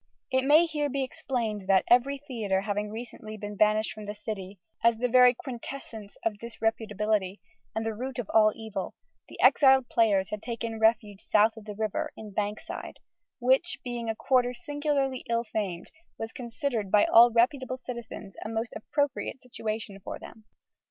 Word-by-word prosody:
It 260 Hz, 0 st, +2 dB
may 305 Hz, +4 st, +6 dB
here 300 Hz, -3 st, -1 dB
be 275 Hz, 0 st, -1 dB
explained 240 Hz, -8 st, -3 dB
that, 190 Hz, -1 st, +5 dB
every 250 Hz, +4 st, +4 dB
theatre 225 Hz, -9 st, -2 dB
having 205 Hz, +1 st, -2 dB
recently 220 Hz, -1 st, -8 dB
been 205 Hz, 0 st, -6 dB
banished 215 Hz, +1 st, +2 dB
from 215 Hz, -1 st, -9 dB
the 205 Hz, +1 st, -5 dB
City 205 Hz, -2 st, -6 dB, 0.3 s
as 230 Hz, -1 st, +4 dB
the 250 Hz, +2 st, +1 dB
very 250 Hz, 0 st, +6 dB
quintessence 235 Hz, -4 st, -8 dB
of 210 Hz, -2 st, -1 dB
disreputability 215 Hz, -3 st, -1 dB, 0.4 s
and 220 Hz, 0 st, -1 dB
root 240 Hz, +4 st, -4 dB
of 245 Hz, -5 st, -3 dB
all 215 Hz, -1 st, +6 dB
evil, 220 Hz, -4 st, -5 dB, 0.3 s
the -, -, -12 dB
exiled 265 Hz, -3 st, +6 dB
players 200 Hz, -4 st, +2 dB
had 210 Hz, -1 st, -4 dB
taken 230 Hz, -1 st, -4 dB
refuge 220 Hz, -3 st, +2 dB
south 215 Hz, +1 st, +3 dB
of 220 Hz, -2 st, -11 dB
the 210 Hz, -1 st, -7 dB
river, 215 Hz, -1 st, -2 dB
in 215 Hz, -2 st, -9 dB
Bankside: 210 Hz, +1 st, -4 dB, 0.4 s
which, 260 Hz, +6 st, +2 dB
being 240 Hz, -3 st, -4 dB
a 225 Hz, -, -1 dB
quarter 250 Hz, 0 st, +2 dB
singularly 290 Hz, -4 st, -1 dB
ill 235 Hz, 0 st, +1 dB
famed, 200 Hz, -6 st, -4 dB, 0.3 s
was 225 Hz, 0 st, -5 dB
considered 235 Hz, -, -3 dB
by 205 Hz, +1 st, +5 dB
all 235 Hz, +1 st, +8 dB
reputable 255 Hz, +2 st, +1 dB
citizens 235 Hz, -6 st, -8 dB
a 215 Hz, -, -5 dB
most 225 Hz, +1 st, -3 dB
appropriate 275 Hz, +3 st, -2 dB
situation 215 Hz, -5 st, -5 dB
for -, -, -6 dB
them. 220 Hz, -, -13 dB
225 Hz, 165 wpm, -28 LUFS, 210-255 Hz, 0.4 s, all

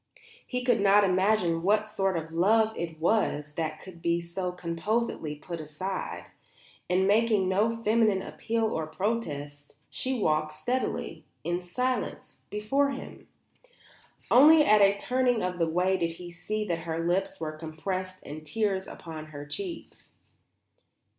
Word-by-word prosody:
He 250 Hz, -1 st, -2 dB
could 245 Hz, -4 st, +3 dB
not 200 Hz, +1 st, +6 dB
imagine 185 Hz, -3 st, +2 dB
what 210 Hz, +4 st, +2 dB
sort 195 Hz, -4 st, 0 dB
of 160 Hz, 0 st, -5 dB
love 215 Hz, +6 st, +3 dB
it 165 Hz, -2 st, -5 dB
was 160 Hz, -5 st, +1 dB
that 155 Hz, -1 st, -3 dB
could 175 Hz, -3 st, -13 dB, 0.2 s
so 180 Hz, +2 st, -3 dB
composedly 180 Hz, -1 st, -2 dB
be -, -, -18 dB
put 170 Hz, 0 st, -6 dB
aside. 170 Hz, +6 st, -5 dB, 0.6 s
And 185 Hz, +1 st, +3 dB
making 210 Hz, -2 st, +3 dB
no 210 Hz, +5 st, +2 dB
feminine 215 Hz, -3 st, +3 dB
appeal 230 Hz, 0 st, -2 dB
or 160 Hz, -1 st, -2 dB
protest, 150 Hz, -7 st, -3 dB, 0.2 s
she 260 Hz, 0 st, -1 dB
walked 155 Hz, -4 st, +1 dB
steadily, 250 Hz, +11 st, -3 dB, 0.2 s
in 175 Hz, +1 st, -1 dB
silence, 250 Hz, +8 st, -3 dB
before 245 Hz, +7 st, +1 dB
him. 270 Hz, -1 st, -8 dB, 1.0 s
Only 300 Hz, +4 st, +8 dB
at 210 Hz, 0 st, +6 dB
a 200 Hz, 0 st, +5 dB
turning 250 Hz, 0 st, +1 dB
of 180 Hz, 0 st, -2 dB
the 165 Hz, -1 st, +2 dB
way 180 Hz, +3 st, +2 dB
did 165 Hz, -2 st, -1 dB
he 175 Hz, +1 st, -9 dB
see 215 Hz, +5 st, -3 dB
that 170 Hz, -4 st, -1 dB
her 165 Hz, 0 st, -3 dB
lips 180 Hz, +3 st, 0 dB
were 155 Hz, -1 st, -3 dB
compressed 185 Hz, +4 st, -5 dB
and 155 Hz, +2 st, -7 dB
tears 190 Hz, +3 st, -1 dB
upon 155 Hz, -2 st, -8 dB
her 145 Hz, -1 st, -8 dB
cheeks. 340 Hz, -, -7 dB
185 Hz, 145 wpm, -28 LUFS, 165-215 Hz, 1.0 s, Only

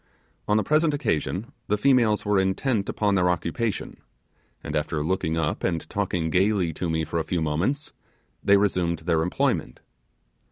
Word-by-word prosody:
On 105 Hz, -, +3 dB
the 110 Hz, -, +2 dB
present 155 Hz, 0 st, +2 dB
occasion 110 Hz, -, -2 dB, 0.2 s
the 105 Hz, -, +1 dB
females 115 Hz, -4 st, +3 dB
were 105 Hz, -1 st, +3 dB
intent 100 Hz, +3 st, 0 dB
upon 105 Hz, -1 st, +1 dB
their 90 Hz, -2 st, +3 dB
occupation, 95 Hz, +5 st, -2 dB, 0.7 s
and 75 Hz, -, -4 dB
after 75 Hz, 0 st, -1 dB
looking 80 Hz, -2 st, 0 dB
up 80 Hz, -1 st, -1 dB
and 85 Hz, -3 st, -1 dB
talking 90 Hz, -5 st, -1 dB
gaily 95 Hz, -2 st, +2 dB
to 85 Hz, +3 st, -3 dB
me 80 Hz, 0 st, 0 dB
for 85 Hz, +2 st, -2 dB
a -, -, -1 dB
few 90 Hz, -, -2 dB
moments, 85 Hz, -, -1 dB, 0.5 s
they 100 Hz, 0 st, +5 dB
resumed 90 Hz, -4 st, +1 dB
their 85 Hz, -2 st, +2 dB
employment. 90 Hz, +3 st, -1 dB
95 Hz, 160 wpm, -25 LUFS, 80-105 Hz, 0.7 s, they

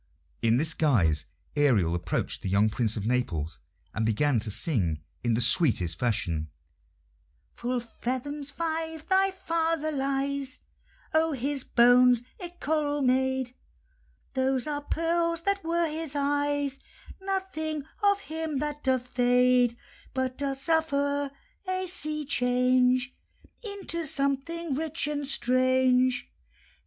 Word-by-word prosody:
In 115 Hz, +1 st, +3 dB
this 160 Hz, +4 st, +2 dB
guise 85 Hz, -, +2 dB, 0.3 s
Ariel 115 Hz, -, +3 dB
approached 85 Hz, -1 st, -2 dB
the -, -, -3 dB
young 105 Hz, +3 st, +3 dB
Prince 115 Hz, 0 st, +1 dB
of 105 Hz, -, -3 dB
Naples, 85 Hz, -, -1 dB, 0.3 s
and 110 Hz, -, -1 dB
began 115 Hz, +4 st, +2 dB
to 110 Hz, -, -2 dB
sing 95 Hz, -, +1 dB, 0.2 s
in 120 Hz, -2 st, +2 dB
the 120 Hz, -, 0 dB
sweetest 115 Hz, -, +3 dB
fashion: 85 Hz, -10 st, 0 dB, 1.0 s
"Full 250 Hz, +1 st, -2 dB
fathom 255 Hz, +5 st, -4 dB
five 320 Hz, +1 st, -3 dB
thy 385 Hz, 0 st, +3 dB
father 330 Hz, -4 st, -1 dB
lies; 275 Hz, -1 st, -2 dB, 0.5 s
Of 315 Hz, -2 st, +2 dB
his 275 Hz, +2 st, -2 dB
bones 245 Hz, 0 st, +5 dB, 0.2 s
a'e 355 Hz, -3 st, -6 dB
coral 295 Hz, -1 st, 0 dB
made; 260 Hz, 0 st, +1 dB, 0.8 s
Those 260 Hz, -1 st, +1 dB
are 295 Hz, -1 st, -3 dB
pearls 335 Hz, +2 st, 0 dB
that 400 Hz, +2 st, -1 dB
were 335 Hz, +1 st, +1 dB
his 310 Hz, -1 st, -4 dB
eyes: 285 Hz, -1 st, 0 dB, 0.4 s
Nothing 380 Hz, -6 st, -3 dB, 0.2 s
of 405 Hz, -1 st, +3 dB
him 320 Hz, -4 st, -4 dB
that 295 Hz, +1 st, -3 dB
doth 260 Hz, -2 st, +1 dB
fade, 245 Hz, -1 st, +3 dB, 0.4 s
But 260 Hz, -1 st, -1 dB
doth 275 Hz, -1 st, -2 dB
suffer 285 Hz, -3 st, +1 dB, 0.4 s
a 370 Hz, 0 st, -1 dB
sea 305 Hz, -4 st, -2 dB
change 250 Hz, 0 st, +2 dB, 0.5 s
Into 390 Hz, -6 st, -2 dB
something 280 Hz, +4 st, -1 dB
rich 315 Hz, +2 st, +1 dB
and 290 Hz, -1 st, -3 dB
strange. 255 Hz, 0 st, +2 dB
270 Hz, 120 wpm, -27 LUFS, 235-315 Hz, 1.0 s, bones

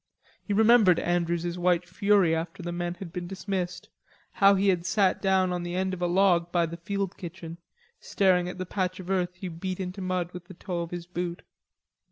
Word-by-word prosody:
He -, -, -7 dB
remembered 215 Hz, -3 st, +5 dB
Andrews's 175 Hz, 0 st, -1 dB
white 180 Hz, 0 st, +2 dB
fury 200 Hz, -5 st, +3 dB
after 165 Hz, +1 st, -5 dB
the 175 Hz, -, -3 dB
men 175 Hz, 0 st, -3 dB
had 175 Hz, -2 st, -9 dB
been 175 Hz, -1 st, -4 dB
dismissed, 185 Hz, -2 st, -4 dB, 0.4 s
how 200 Hz, 0 st, +5 dB
he 195 Hz, +1 st, +2 dB
had 180 Hz, -3 st, +1 dB
sat 190 Hz, +1 st, +2 dB
down 190 Hz, -2 st, +2 dB
on 175 Hz, -, -2 dB
the 175 Hz, 0 st, -4 dB
end 190 Hz, 0 st, -1 dB
of 180 Hz, -, -6 dB
a 175 Hz, -, +2 dB
log 175 Hz, -2 st, +3 dB
by 170 Hz, -1 st, +2 dB
the 165 Hz, +1 st, -7 dB
field 195 Hz, +2 st, -3 dB
kitchen, 170 Hz, -1 st, -8 dB, 0.4 s
staring 180 Hz, -2 st, +2 dB
at 180 Hz, -, -7 dB
the 185 Hz, -, -4 dB
patch 185 Hz, 0 st, -2 dB
of 185 Hz, 0 st, -6 dB
earth 180 Hz, -2 st, 0 dB
he 185 Hz, +1 st, -6 dB
beat 180 Hz, +2 st, -5 dB
into 185 Hz, +1 st, -5 dB
mud 185 Hz, -1 st, -2 dB
with 180 Hz, -1 st, -9 dB
the 185 Hz, 0 st, -12 dB
toe 175 Hz, -1 st, -4 dB
of 170 Hz, -, -5 dB
his 175 Hz, -1 st, -6 dB
boot. 175 Hz, 0 st, -4 dB
180 Hz, 210 wpm, -27 LUFS, 175-190 Hz, 0.4 s, remembered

